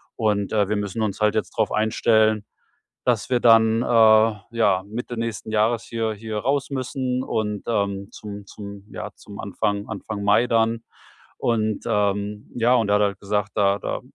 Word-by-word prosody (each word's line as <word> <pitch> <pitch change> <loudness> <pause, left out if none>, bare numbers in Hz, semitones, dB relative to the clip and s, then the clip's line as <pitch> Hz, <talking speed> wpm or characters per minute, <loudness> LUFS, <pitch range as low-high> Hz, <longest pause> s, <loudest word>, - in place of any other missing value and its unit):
Und, 105 -3 0
äh, 105 -2 +2
wir 105 - +1
müssen 105 +1 -3
uns 105 0 -3
halt 105 0 +3
jetzt 110 - -1
drauf - - +1
einstellen, 110 0 +2 0.6
dass 120 -4 +1
wir 125 -1 +2
dann, 115 0 +5
äh, - - -4
ja, 110 -3 +4
Mitte 120 +3 -5
nächsten 115 -1 -4
Jahres 110 +2 +2
hier 115 -1 -2
hier 110 0 -5
raus 140 +4 -1
müssen 130 -1 -2
und, 105 -4 -2
ähm, 100 -3 -1
zum 105 -1 -9
zum 100 -1 -9
ja, - - -6
zum - - -12
Anfang 100 +1 -2
Anfang 105 0 -5
Mai 105 +4 +4
dann. 115 0 +1 0.5
Und, 110 -3 0
ähm 105 +1 -1
ja, 120 +1 +3
und 110 -4 +1
er 100 - +4
hat 105 - +3
halt 100 -2 -1
gesagt: 105 0 -1
„Da 100 -1 +2
da - - -4
110 Hz, 175 wpm, -23 LUFS, 105-115 Hz, 0.6 s, dann